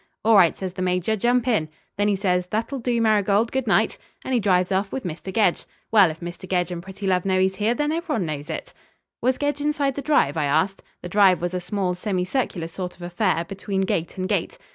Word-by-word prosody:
'All 225 0 +6
right,' 180 -5 +5
says 185 -2 -5
the 185 - -6
Major, 180 +3 +1
'jump 240 +3 +1
in.' 185 -11 +1 0.3
Then 205 +1 +1
he 205 - +2
says: 180 -2 0
'That'll 225 +7 -2
do, 240 -1 0
Marigold. 215 0 +2
Good 265 -2 -1
night.' 220 +2 +2 0.3
And 260 - -2
he 245 - +3
drives 185 -3 +2
off 195 +1 0
with 265 - -4
Mr. 175 +2 -5
Gedge. 205 -4 +2 0.3
Well, 205 -5 +6
if 160 +2 -8
Mr. 175 +2 -8
Gedge 180 -1 0
and 175 -1 -4
Prettilove 190 -1 -1
know 190 -1 +1
he's 190 0 +1
here, 220 +3 +1
then 295 +2 0
everyone 320 - -1
knows 150 0 -5
it." 160 - -5 0.5
"Was 255 +1 +2
Gedge 290 0 -1
inside 290 -2 0
the 280 - -4
drive?" 275 - +2
I - - +1
asked. 160 +7 +1 0.2
The 175 - -5
drive 195 -1 +5
was 175 +1 -3
a 180 - -1
small 180 +1 -2
semicircular 185 0 -2
sort 180 +1 -6
of 175 - -12
affair, 175 -1 0
between 195 +1 -3
gate 175 -3 -2
and 185 0 -2
gate. - - -1
195 Hz, 225 wpm, -23 LUFS, 180-225 Hz, 0.5 s, All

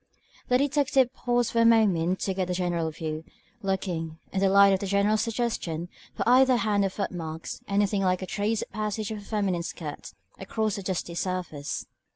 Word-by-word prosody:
The 250 - +4
detective 275 -2 +2
paused 240 -2 0
for 230 - +2
a - - +6
moment 190 -6 +4
to 195 - 0
get 185 -1 -2
a 180 - 0
general 175 -3 0
view, 155 0 -5 0.4
looking, 180 -5 -2 0.2
in 195 - 0
the 195 0 +3
light 200 0 +7
of 190 - +1
the 200 - -3
General's 200 +2 +2
suggestion, 220 -8 -2 0.3
for - - -2
either 255 +1 +6
hand 210 -3 +1
or 195 - +1
foot 195 +1 -3
marks, 160 -2 -6
anything 200 0 +1
like 185 -1 +1
a - - -2
trace 210 +3 -1
of - - -12
the - - -34
passage 215 0 -2
of 215 - -4
a - - -10
feminine 200 -4 -1
skirt, 155 -3 -7 0.2
across 215 +2 -1
the 200 - -4
dusty 185 -2 -3
surface. 175 -5 -3
195 Hz, 195 wpm, -27 LUFS, 175-220 Hz, 0.4 s, light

